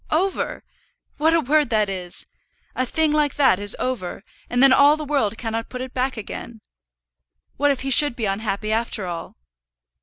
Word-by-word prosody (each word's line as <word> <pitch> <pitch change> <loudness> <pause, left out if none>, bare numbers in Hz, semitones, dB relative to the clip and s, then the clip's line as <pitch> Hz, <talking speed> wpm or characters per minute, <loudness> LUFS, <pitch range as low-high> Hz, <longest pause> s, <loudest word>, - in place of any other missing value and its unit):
"Over! 370 +5 -1 0.5
What 320 +2 +3
a 330 - +3
word 295 -1 +2
that 215 -3 +2
is! 180 -2 -6 0.5
A 255 - 0
thing 315 +3 +1
like 300 -2 +1
that 265 -10 +3
is 205 0 0
over, 225 -7 -4 0.3
and 245 +2 +2
then 270 -1 +7
all 285 +3 +5
the 305 - -5
world 265 -7 0
cannot 225 -1 -4
put 250 - -7
it 255 0 -6
back 255 0 -1
again. 220 +1 -8 1.0
What 290 +1 +2
if 275 -2 0
he 270 +1 -3
should 290 0 +4
be 230 - -3
unhappy 210 +1 -2
after 220 -3 0
all?" 170 -2 -6
255 Hz, 180 wpm, -22 LUFS, 215-290 Hz, 1.0 s, then